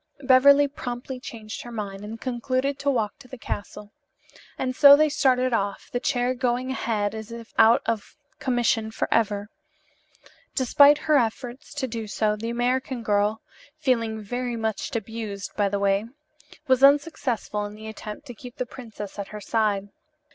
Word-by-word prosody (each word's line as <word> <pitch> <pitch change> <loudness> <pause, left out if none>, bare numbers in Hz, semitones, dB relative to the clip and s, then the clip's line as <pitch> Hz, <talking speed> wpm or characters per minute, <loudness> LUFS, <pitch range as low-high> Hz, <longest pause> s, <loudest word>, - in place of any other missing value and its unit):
Beverly 280 +2 +6
promptly 250 -1 -6
changed 220 -3 -8
her 240 - -9
mind 205 -3 -5
and 220 +2 -7
concluded 255 +2 -1
to 280 - 0
walk 225 -5 -1
to 265 - -15
the 260 - -9
castle. 205 -1 -6 0.7
And 255 -1 -2
so 285 0 +9
they 305 +1 +3
started 255 -4 +2
off, 200 -3 -2
the 245 - -1
chair 245 0 0
going 255 0 -1
ahead 215 -5 -1
as 220 0 -7
if 230 -1 -9
out 225 +1 +6
of 225 +5 -3 0.2
commission 240 -3 +1
forever. 210 -2 0 1.1
Despite 285 +3 +6
her 305 0 +2
efforts 245 +4 -4
to 270 -2 -2
do 225 -2 -5
so, 210 0 0
the 225 +2 -5
American 245 +1 -1
girl 210 0 +1 0.3
(feeling 230 -7 0
very 245 +3 -3
much 220 +2 -3
abused, 220 -3 -5
by 205 -1 +1
the 200 - -1
way), 200 +1 +1 0.6
was 260 -2 +3
unsuccessful 275 -7 +2
in 205 - -11
the 215 +1 -11
attempt 215 +4 -8
to 245 - -8
keep 245 +2 -11
the 250 - -3
princess 220 -6 -9
at 200 - -4
her 210 - -8
side. 205 -3 0
235 Hz, 160 wpm, -25 LUFS, 215-255 Hz, 1.1 s, so